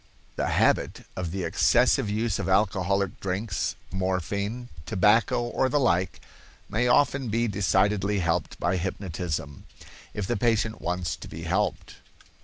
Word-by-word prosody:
—The - - -1
habit - - +1
of 90 -2 -3
the 95 +2 -3
excessive 85 +4 +3
use 110 0 0
of 90 - -2
alcoholic 95 -1 +1
drinks, 95 +1 -2 0.2
morphine, 100 +6 -2 0.2
tobacco, 110 +4 +3
or 125 +2 0
the 145 - +2
like, 95 - +1 0.5
may 115 +5 0
often 130 0 +3
be 115 +2 +1
decidedly 100 0 +1
helped 85 -3 -1
by 90 +2 +1
hypnotism, 85 -6 -4 0.5
if 105 - -2
the - - -1
patient 110 0 +1
wants 90 +1 -2
to - - -10
be - - -8
helped. - - -1
100 Hz, 135 wpm, -26 LUFS, 90-110 Hz, 0.5 s, excessive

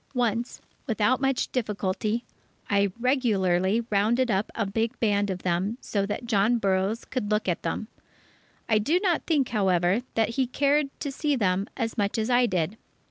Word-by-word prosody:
Once, 240 0 -1 0.3
without 225 +2 +1
much 270 -1 0
difficulty, 215 -1 -1 0.5
I 200 -1 +3
regularly 215 -5 +1
rounded 230 +5 +2
up 195 +2 0
a 220 - 0
big 225 +3 -2
band 205 -2 +1
of 185 -1 -4
them 185 +6 0
so 200 -5 -2
that 215 +4 -4
John 225 +1 +2
Burroughs 195 +1 0
could 250 -6 -3
look 210 -1 0
at 175 - 0
them. 215 - -3 0.8
I 220 -2 +3
do 305 +12 +2
not 365 -4 0
think, 290 -6 +2
however, 190 -1 +2
that 225 -1 +2
he 255 +2 0
cared 285 +3 +2
to 285 - -2
see 295 +1 0
them 195 -3 +1
as 230 -2 -2
much 200 +1 0
as 220 +2 0
I 245 0 +4
did. 185 +1 -1
220 Hz, 170 wpm, -26 LUFS, 200-245 Hz, 0.8 s, I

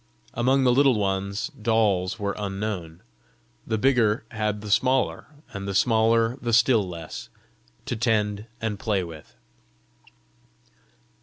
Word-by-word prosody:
Among 130 +3 +2
the 125 -1 +4
Little 135 -2 +4
Ones, 100 +3 -1
dolls 110 -7 0
were 100 -2 -2
unknown; 95 -4 -5 0.6
the 110 - 0
bigger 115 -3 +2
had 105 -2 -2
the 105 -1 -6
smaller, 130 +5 +1 0.3
and 100 -1 -5
the 100 - -3
smaller 115 +2 +3
the 120 -1 -2
still 115 -3 +4
less, 80 -8 -8 0.6
to - - -2
tend 105 -2 0
and 110 -3 -3
play 100 -4 0
with. 80 -3 -11
105 Hz, 125 wpm, -25 LUFS, 100-115 Hz, 0.6 s, the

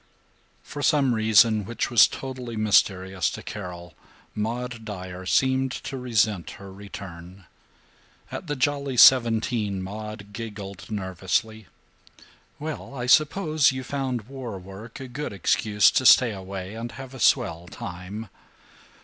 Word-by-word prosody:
IV - - -26
For 145 - -6
some 140 -4 +3
reason 110 0 +4
which 115 +3 -3
was 120 - +7
totally 130 -3 -7
mysterious 95 -3 +2
to - - -8
Carol, 90 -3 -8 0.4
Maud 115 +2 -4
Dyer 95 -3 -7
seemed 130 +2 +2
to - - -6
resent 110 - 0
her 95 0 -11
return. 95 -2 -10 0.9
At 180 - -6
the 145 - -2
Jolly 140 0 -1
Seventeen 115 -5 +5
Maud 105 +1 -8
giggled 100 -5 -8
nervously, 100 +2 -2 0.9
"Well, 150 -2 -6
I 120 -2 -4
suppose 155 +2 +4
you 130 0 -5
found 130 -4 -3
war 125 -3 -7
work 95 +6 -10
a 135 - -7
good 130 -1 -5
excuse 105 +2 +3
to 130 - +1
stay 125 -3 +7
away 95 0 -7
and 115 +1 -6
have 135 -1 -9
a 130 - -9
swell 85 -5 +2
time. 90 +5 -7
110 Hz, 130 wpm, -25 LUFS, 95-130 Hz, 0.9 s, was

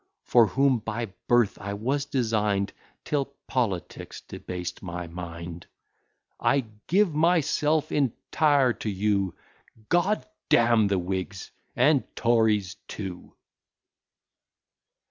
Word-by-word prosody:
For 120 -3 +5
whom 135 +1 +2
by 110 -1 -4
birth 120 -4 +3
I 100 0 -4
was 135 +7 -1
design'd, 105 -7 0 0.3
Till 145 -2 0 0.2
politics 105 -10 -3
debased 90 0 -6
my 90 -1 -5
mind; 85 0 -8 0.7
I 140 -2 +2 0.2
give 190 -1 +3
myself 155 -1 +2
entire 140 0 +2
to 110 - -4
you; 100 -2 0 0.6
G 175 - +6
d 205 +4 -1 0.3
d - - +6
n 115 -2 +4
the 100 -1 +1
Whigs 95 +1 -4 0.2
and 135 +2 +4
Tories 110 -5 +2
too! 95 -3 -7
110 Hz, 105 wpm, -26 LUFS, 95-140 Hz, 0.7 s, G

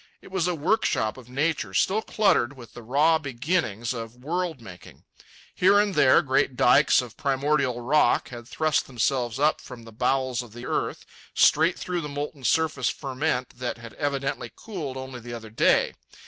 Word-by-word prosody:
It - - -16
was 185 -2 0
a 180 - 0
workshop 150 - 0
of 125 -2 -14
nature 135 - -1
still 205 - +2
cluttered 195 - +2
with 120 -4 -13
the 120 - -10
raw 150 +7 +3
beginnings 125 - -2
of 115 -1 -7
world 160 +4 -3
making. 90 -6 -13 0.5
Here 195 +3 +4
and 205 -1 +1
there 130 -6 +5
great 130 -1 +1
dikes 140 +2 +4
of 120 -3 -11
primordial 140 -2 0
rock 130 0 +2
had 120 -1 -9
thrust 155 +3 0
themselves 125 -1 -1
up 150 +3 +2
from 125 -2 -11
the 115 - -12
bowels 130 +1 0
of 120 -2 -13
earth, 120 - -3 0.3
straight 160 +4 +4
through 180 -1 -3
the 150 - -6
molten 145 0 -5
surface 160 -1 +1
ferment 130 -3 -3
that 125 -1 -3
had 115 -1 -11
evidently 140 -5 -3
cooled 155 -12 -6
only 130 -1 -7
the 120 0 -8
other 110 -2 -10
day. 110 - +3
135 Hz, 170 wpm, -25 LUFS, 120-155 Hz, 0.5 s, there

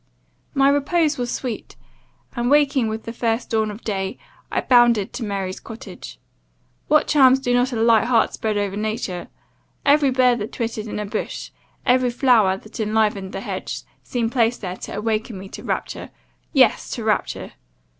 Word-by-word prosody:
"My 275 0 +4
repose 290 +2 +2
was 245 -1 -2
sweet; 245 -5 -5 0.6
and, 240 0 0
waking 280 -4 +3
with 220 0 -4
the 230 - -6
first 230 0 -1
dawn 220 -1 +1
of 210 +2 -9
day, 195 -3 -2 0.3
I - - +1
bounded 240 -5 +4
to 245 - -4
Mary's 195 -3 -3
cottage. 230 +4 -10 0.7
What 305 0 +4
charms 265 -3 +6
do 245 -2 0
not 245 +2 +2
a - - -3
light 225 0 +4
heart 235 -2 +2
spread 215 -1 -1
over 200 -1 -1
nature! 210 -4 -3 0.6
Every 285 0 +5
bird 250 -2 +3
that 210 - -4
twittered 225 -2 -3
in 210 - -5
a 210 - -3
bush, 200 - -4 0.3
every 250 0 +3
flower 235 -6 +3
that 215 +3 -12
enlivened 210 -3 0
the - - -5
hedge, - - -5 0.2
seemed 235 -2 -2
placed 240 -2 +1
there 185 -2 -5
to - - -7
awaken 220 0 -2
me 190 +1 -8
to - - -9
rapture - - -3 0.4
yes; - - +3
to - - -5
rapture. - - -1
230 Hz, 170 wpm, -22 LUFS, 210-255 Hz, 0.7 s, charms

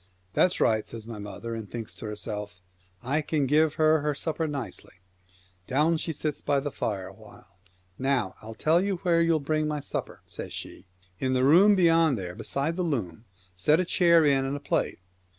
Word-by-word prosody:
" 90 0 -39
That's 180 - +2
right," 110 -1 +2
says 115 -2 -8
my 115 -2 -7
mother, 105 +3 -7
ofFaer - - -2
y 115 - -4
and 105 -3 -9
thinks 115 -2 -6
to 110 - -8
herself, 105 -2 -5 0.2
" 90 0 -34
I 155 - +3
can 150 -1 0
give 155 +3 +3
her 155 0 +4
her 150 0 -1
supper 160 +2 -2
nicely." 140 -10 -6 0.7
Down 155 +5 +2
she 160 - -3
sits 150 -1 -4
by 140 -1 +1
the 145 +1 -4
fire 100 -7 -3
a - - -10
while. 90 - -17 0.2
" 90 0 -37
Now 130 -7 0
I'll 110 +1 -9
tell 160 - +2
you 200 -1 0
where 170 -2 +3
you'll 165 -1 +3
bring 155 +1 0
my 150 -1 -2
supper," - - -5
says - - -8
she. 95 - -8 0.2
" - - -29
In 130 0 0
the 130 0 +2
room 185 +9 +6
beyond 165 -6 +4
there 90 -3 -5
beside 140 - -3
the - - 0
loom 115 - -3 0.2
— - - -29
set 150 - +3
a 185 - +1
chair 170 -2 +4
in 135 -2 +3
and 135 +2 -2
a - - -8
plate." 145 - -1
140 Hz, 220 wpm, -27 LUFS, 110-160 Hz, 0.7 s, room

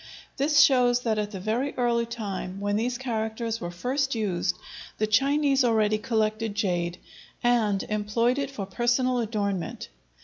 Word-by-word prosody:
This 290 +1 +4
shows 245 -3 +4
that 220 -3 0
at 210 -1 -2
the 200 -3 -7
very 230 +8 -1
early 235 -1 +1
time 195 -5 -5
when 205 0 -1
these 240 +3 -1
characters 225 -2 -3
were 175 - -3
first 260 +9 -1
used, 185 -5 -1 0.4
the 215 - +1
Chinese 275 +5 +3
already 215 -3 +2
collected 220 -2 -1
jade 175 -4 -1 0.5
and 220 -5 +2
employed 220 +5 0
it 275 -1 -2
for 215 -8 -5
personal 245 +5 +1
adornment. 200 - -3
225 Hz, 145 wpm, -26 LUFS, 205-245 Hz, 0.5 s, This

